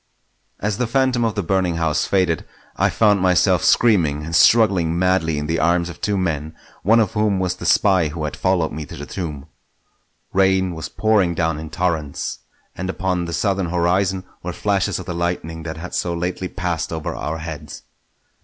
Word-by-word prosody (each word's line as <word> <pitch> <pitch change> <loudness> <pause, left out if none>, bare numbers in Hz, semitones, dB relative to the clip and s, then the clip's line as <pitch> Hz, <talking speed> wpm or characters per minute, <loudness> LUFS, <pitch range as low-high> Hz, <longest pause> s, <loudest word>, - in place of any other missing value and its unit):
As 105 +1 -2
the 125 - +1
phantom 130 0 +1
of 110 -2 0
the 105 - -1
burning 90 -1 0
house 80 -2 0
faded, 90 -5 +1 0.3
I - - +2
found 105 -3 +3
myself 90 -1 +3
screaming 80 -11 +3
and 80 +1 -3
struggling 95 -5 +4
madly 90 -4 +1
in 75 - -2
the 80 +2 -1
arms 85 +2 +2
of 85 - -10
two 105 -1 0
men, 80 -4 -2 0.3
one 115 +5 +4
of 110 - +2
whom 105 -3 +1
was 90 -1 -1
the - - -4
spy 95 -5 +4
who 75 +1 -5
had 75 - -3
followed 90 -4 +1
me 80 - -5
to - - -9
the 75 - -6
tomb. 75 -5 -5 0.9
Rain 95 -1 +2
was 80 -1 -6
pouring 105 -6 +2
down 80 -2 0
in 80 0 -7
torrents, 80 -4 -2 0.4
and 95 +1 -4
upon 95 -2 -1
the 85 - -5
southern 95 -1 0
horizon 90 +2 +1 0.2
were - - -5
flashes 100 -2 0
of 95 - -7
the 90 - -4
lightning 85 -1 -3
that 80 0 -6
had 90 +3 -8
so 85 -1 -1
lately 90 +2 -3
passed 85 -4 -3
over 80 -2 -3
our 80 +2 -4
heads. 80 -2 -8
90 Hz, 190 wpm, -21 LUFS, 80-95 Hz, 0.9 s, struggling